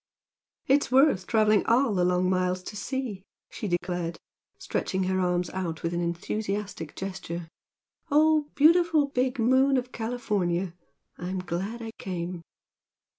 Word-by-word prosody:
"It's 275 -2 +2
worth 260 - +4
travelling 215 -2 +4
all 235 0 +3
the 180 -2 +2
long 180 0 +2
miles 185 0 0
to 210 - -8
see!" 250 -4 -4 0.3
she 210 - -5
declared, 175 -2 -2 0.4
stretching 190 0 -2
her 185 0 0
arms 180 -1 0
out 170 -4 -4
with 165 +1 -1
an 175 - -1
enthusiastic 195 0 -3
gesture 185 -3 -5 0.6
"Oh, 305 0 +4
beautiful 320 -1 +5
big 255 0 0
moon 260 +3 +4
of 250 0 -3
California! 195 -7 -1 0.5
I'm 180 +2 -3
glad 185 +6 -4
I 225 - -5
came!" 175 -2 -4
195 Hz, 130 wpm, -27 LUFS, 180-250 Hz, 0.6 s, beautiful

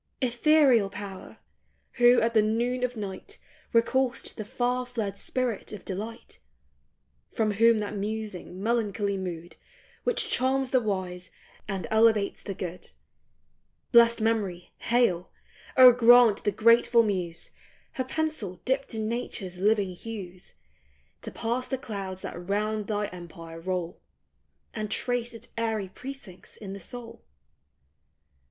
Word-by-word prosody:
Ethereal 255 -3 +4
power! 195 -1 -8 0.6
who 245 0 +7
at 230 +1 +1
the 220 - +5
noon 240 +4 0
of 250 -1 -1
night 205 - -6 0.3
Recall'st 245 +2 +1
the 215 - -5
far 245 +4 -1
fled 220 -5 -3
spirit 245 +1 -2
of 210 -3 -9
delight; 215 +4 -7 0.9
From 220 -2 0
whom 230 +2 +4
that 210 0 -4
musing, 205 -3 -5
melancholy 210 -3 0
mood 175 -3 -6 0.5
Which 485 - +1
charms 260 +1 +1
the 255 - +4
wise, 185 -5 -3 0.4
and 190 -4 -3
elevates 220 -2 +3
the 195 - -6
good; 180 0 -6 1.0
Blest 235 -1 +6
Memory, 210 -6 -1
hail! 230 -8 +1 0.5
O 255 -1 +11
grant 240 -3 +6
the 205 - +3
grateful 230 +3 +5
muse, 180 -5 -3 0.4
Her 260 - -2
pencil 260 - -3
dipped 265 -2 -1
in 220 -1 -2
nature's 210 -6 -4
living 205 -1 +2
hues, 185 -3 -9 0.7
To - - -6
pass 240 +2 -2
the 265 - -2
clouds 195 -7 -6
that 175 +2 -7
round 210 +1 -1
thy 210 -1 -1
empire 165 -2 -10
roll, 180 0 -3 0.7
And 215 -1 -4
trace 240 +1 -2
its 230 +1 -13
airy 220 -4 -1
precincts 250 -4 -10
in 195 -3 -7
the 200 - -7
soul. 230 +3 -8
220 Hz, 130 wpm, -27 LUFS, 195-240 Hz, 1.0 s, O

